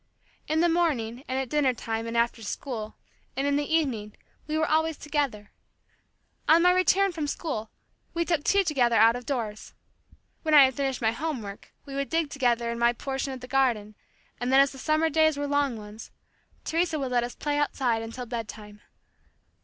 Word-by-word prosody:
In 315 Hz, +1 st, +1 dB
the 345 Hz, -, +4 dB
morning, 275 Hz, -9 st, 0 dB
and 260 Hz, -, -2 dB
at 265 Hz, -1 st, -1 dB
dinner 270 Hz, -1 st, +1 dB
time, 225 Hz, 0 st, -4 dB
and 230 Hz, 0 st, -3 dB
after 235 Hz, 0 st, +1 dB
school, 220 Hz, 0 st, -5 dB, 0.4 s
and 270 Hz, -, 0 dB
in 285 Hz, 0 st, +2 dB
the 290 Hz, +1 st, -1 dB
evening, 245 Hz, -10 st, 0 dB, 0.3 s
we 310 Hz, 0 st, -1 dB
were 315 Hz, 0 st, +1 dB
always 320 Hz, 0 st, +1 dB
together. 280 Hz, -9 st, -2 dB, 1.0 s
On 330 Hz, +2 st, +6 dB
my 360 Hz, -, +6 dB
return 370 Hz, +2 st, +3 dB
from 320 Hz, -4 st, -3 dB
school, 225 Hz, -9 st, -4 dB, 0.5 s
we 340 Hz, 0 st, +1 dB
took 330 Hz, -4 st, 0 dB
tea 400 Hz, +3 st, +3 dB
together 255 Hz, -9 st, +2 dB
out 225 Hz, +2 st, +6 dB
of 245 Hz, 0 st, -7 dB
doors. 225 Hz, -6 st, -4 dB, 0.7 s
When 310 Hz, -1 st, +2 dB
I 285 Hz, -, +10 dB
had 265 Hz, -, 0 dB
finished 270 Hz, -2 st, -2 dB
my 220 Hz, -, +3 dB
home 280 Hz, 0 st, -3 dB
work, 200 Hz, 0 st, -10 dB
we 275 Hz, -, -9 dB
would 275 Hz, 0 st, -2 dB
dig 325 Hz, -3 st, 0 dB
together 240 Hz, -4 st, +1 dB
in 235 Hz, -, -4 dB
my 235 Hz, 0 st, +4 dB
portion 270 Hz, +2 st, -4 dB
of 260 Hz, -1 st, -7 dB
the 250 Hz, -, -8 dB
garden, 245 Hz, -6 st, +1 dB, 0.5 s
and 245 Hz, +2 st, -1 dB
then 265 Hz, -, +6 dB
as 275 Hz, 0 st, +5 dB
the 270 Hz, -, -11 dB
summer 310 Hz, +3 st, +2 dB
days 315 Hz, 0 st, +3 dB
were 290 Hz, -, -2 dB
long 285 Hz, -4 st, 0 dB
ones, 210 Hz, +1 st, -10 dB, 0.6 s
Teresa 330 Hz, -1 st, 0 dB
would 270 Hz, -3 st, -3 dB
let 240 Hz, -1 st, +2 dB
us 240 Hz, -, -5 dB
play 290 Hz, -1 st, -1 dB
outside 250 Hz, -5 st, 0 dB
until 230 Hz, +2 st, -6 dB
bed 230 Hz, -2 st, -4 dB
time. 210 Hz, -1 st, -11 dB
270 Hz, 200 wpm, -27 LUFS, 235-305 Hz, 1.0 s, I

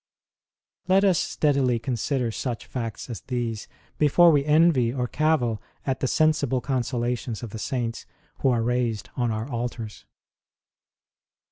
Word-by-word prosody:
Let 190 Hz, +1 st, +4 dB
us 185 Hz, -3 st, +4 dB
steadily 140 Hz, -8 st, +1 dB
consider 125 Hz, +1 st, -1 dB
such 120 Hz, +1 st, -4 dB
facts 115 Hz, -4 st, -5 dB
as 115 Hz, -6 st, -6 dB
these 120 Hz, -4 st, -3 dB, 0.3 s
before 165 Hz, +3 st, +6 dB
we 145 Hz, -2 st, +3 dB
envy 150 Hz, -6 st, +4 dB
or 125 Hz, -1 st, -2 dB
cavil 130 Hz, -7 st, +1 dB, 0.2 s
at 130 Hz, -2 st, -1 dB
the 130 Hz, -, 0 dB
sensible 155 Hz, -3 st, +2 dB
consola 125 Hz, -2 st, -1 dB
tions 120 Hz, -1 st, -6 dB
of 115 Hz, -, -6 dB
the 110 Hz, -, -6 dB
Saints 120 Hz, -1 st, -3 dB, 0.3 s
who 135 Hz, -, +2 dB
are 120 Hz, -2 st, +2 dB
raised 120 Hz, -3 st, -1 dB
on 120 Hz, -2 st, 0 dB
our 110 Hz, +1 st, -2 dB
altars. 120 Hz, -4 st, -5 dB
125 Hz, 140 wpm, -25 LUFS, 115-140 Hz, 0.3 s, before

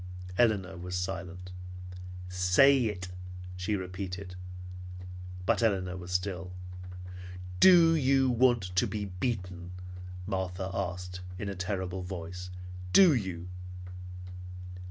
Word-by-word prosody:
Elinor 100 Hz, -6 st, +3 dB
was 90 Hz, +1 st, -4 dB
silent. 90 Hz, 0 st, -3 dB, 0.8 s
"Say 90 Hz, +9 st, +6 dB
it!" 90 Hz, -4 st, -2 dB, 0.5 s
she 90 Hz, +3 st, 0 dB
repeated. 90 Hz, 0 st, -4 dB, 1.1 s
But -, -, +3 dB
Elinor 95 Hz, -5 st, +2 dB
was 90 Hz, -1 st, -6 dB
still. 90 Hz, 0 st, -1 dB, 1.1 s
"Do 170 Hz, -3 st, +9 dB
you 135 Hz, -2 st, +4 dB
want 120 Hz, -2 st, +5 dB
to -, -, +5 dB
be 105 Hz, -2 st, -2 dB
beaten?" 90 Hz, -2 st, -3 dB, 0.5 s
Martha 95 Hz, -1 st, -1 dB
asked 90 Hz, -1 st, -3 dB, 0.2 s
in 100 Hz, +1 st, -2 dB
a 100 Hz, -, -3 dB
terrible 95 Hz, -1 st, -2 dB
voice. 90 Hz, 0 st, -5 dB, 0.4 s
"Do 185 Hz, -5 st, +9 dB
you?" 95 Hz, -7 st, -1 dB
95 Hz, 100 wpm, -31 LUFS, 90-105 Hz, 1.1 s, Do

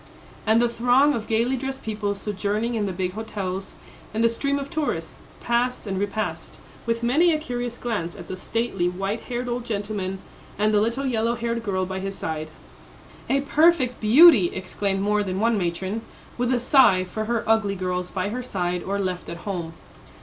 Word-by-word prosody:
And 220 Hz, +1 st, +5 dB
the 240 Hz, -, +4 dB
throng 245 Hz, +5 st, +3 dB
of 220 Hz, -5 st, -3 dB
gaily 230 Hz, +4 st, +1 dB
dressed 270 Hz, +1 st, -5 dB
people 210 Hz, -2 st, -2 dB
sojourning 210 Hz, +3 st, -2 dB
in 215 Hz, -3 st, 0 dB
the -, -, -2 dB
big 185 Hz, 0 st, -2 dB
hotels, 195 Hz, -3 st, -4 dB, 0.4 s
and 225 Hz, -, +1 dB
the 230 Hz, -, +5 dB
stream 280 Hz, +4 st, 0 dB
of 280 Hz, -1 st, -4 dB
tourists, 310 Hz, -2 st, -3 dB, 0.2 s
passed 240 Hz, +1 st, 0 dB
and 195 Hz, -2 st, -2 dB
repassed, 200 Hz, -5 st, -3 dB, 0.3 s
with 230 Hz, 0 st, 0 dB
many 310 Hz, +9 st, +4 dB
a 310 Hz, -, +2 dB
curious 245 Hz, -5 st, -4 dB
glance 205 Hz, -8 st, -3 dB
at 180 Hz, -4 st, -10 dB
the 185 Hz, -, -4 dB
stately, 195 Hz, -2 st, -1 dB
white 195 Hz, +4 st, -2 dB
haired 245 Hz, 0 st, -2 dB
old 240 Hz, 0 st, -2 dB
gentleman 205 Hz, -4 st, -3 dB, 0.4 s
and 215 Hz, +1 st, +2 dB
the 205 Hz, -, +4 dB
little 235 Hz, +5 st, 0 dB
yellow 235 Hz, -2 st, +1 dB
haired 235 Hz, 0 st, -2 dB
girl 190 Hz, -4 st, -1 dB
by 190 Hz, +1 st, -4 dB
his 195 Hz, 0 st, -4 dB
side. 155 Hz, -1 st, -4 dB, 0.8 s
"A 275 Hz, +1 st, +3 dB
perfect 290 Hz, -3 st, +3 dB
beauty!" 230 Hz, -, +8 dB
exclaimed 195 Hz, +1 st, -2 dB
more 210 Hz, +1 st, +2 dB
than 190 Hz, -2 st, -2 dB
one 230 Hz, +2 st, +3 dB
matron, 190 Hz, +3 st, -2 dB, 0.3 s
with 245 Hz, +1 st, 0 dB
a 250 Hz, -, +2 dB
sigh 240 Hz, -7 st, +5 dB
for 215 Hz, +4 st, -4 dB
her 235 Hz, 0 st, 0 dB
ugly 220 Hz, -3 st, +2 dB
girls 180 Hz, -1 st, -2 dB
by 190 Hz, +1 st, -2 dB
her 245 Hz, +4 st, -3 dB
side 180 Hz, -7 st, -2 dB
or 200 Hz, +3 st, -2 dB
left 185 Hz, -2 st, -3 dB
at 170 Hz, 0 st, -8 dB
home. 175 Hz, -5 st, -3 dB
215 Hz, 185 wpm, -24 LUFS, 190-240 Hz, 0.8 s, beauty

